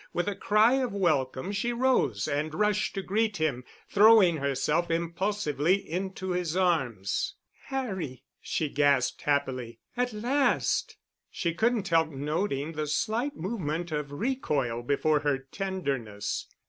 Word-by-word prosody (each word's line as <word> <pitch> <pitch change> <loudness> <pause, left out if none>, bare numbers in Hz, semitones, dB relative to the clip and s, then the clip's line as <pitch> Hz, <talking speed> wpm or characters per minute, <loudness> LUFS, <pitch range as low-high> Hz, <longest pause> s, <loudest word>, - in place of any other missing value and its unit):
With 175 +3 -1
a 205 - 0
cry 220 +5 +4
of 250 -5 -2
welcome 155 -4 0
she 235 +4 -1
rose 240 - +1
and 150 +2 -2
rushed 210 +2 +1
to 195 - -2
greet 215 +2 0
him, 145 -6 -1 0.2
throwing 205 -5 +6
herself 145 +4 0
impulsively 170 -1 0
into 190 0 -4
his 180 -1 -1
arms. 135 - 0 0.3
"Harry," 190 - -4 0.2
she 155 - -1
gasped 140 -3 +2
happily, 130 -5 -1 0.2
"at 250 0 0
last!" 250 +6 +1 0.3
She 170 -2 -2
couldn't 220 +1 +1
help 165 -1 +3
noting 150 +1 -2
the 155 -1 -3
slight 230 - -1
movement 175 -4 -3
of 150 -2 -3
recoil 145 - -1
before 145 +4 +2
her 145 -2 +1
tenderness. 135 - -3
170 Hz, 130 wpm, -28 LUFS, 145-210 Hz, 0.3 s, throwing